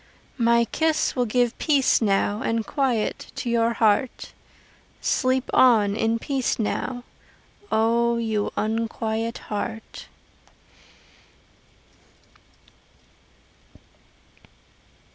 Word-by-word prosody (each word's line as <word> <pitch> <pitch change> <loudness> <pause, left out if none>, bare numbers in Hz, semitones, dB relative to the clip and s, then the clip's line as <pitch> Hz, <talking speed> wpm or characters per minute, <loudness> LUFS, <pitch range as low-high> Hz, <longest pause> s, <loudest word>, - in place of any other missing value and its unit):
My 235 0 +4
kiss 315 +5 0
will 250 -2 0
give 245 +1 +1
peace 285 -6 +3
now 205 0 +1
And 225 -1 -1
quiet 255 -7 -1
to 240 - -3
your 235 0 +2
heart 225 +3 0 0.7
Sleep 260 +1 0
on 215 -5 +5
in 225 +1 +1
peace 265 +2 -1
now, 245 +3 -3 0.7
O 235 +2 +2
you 220 -3 -1
unquiet 225 +1 -2
heart! 220 +2 -6
230 Hz, 80 wpm, -24 LUFS, 220-245 Hz, 0.7 s, on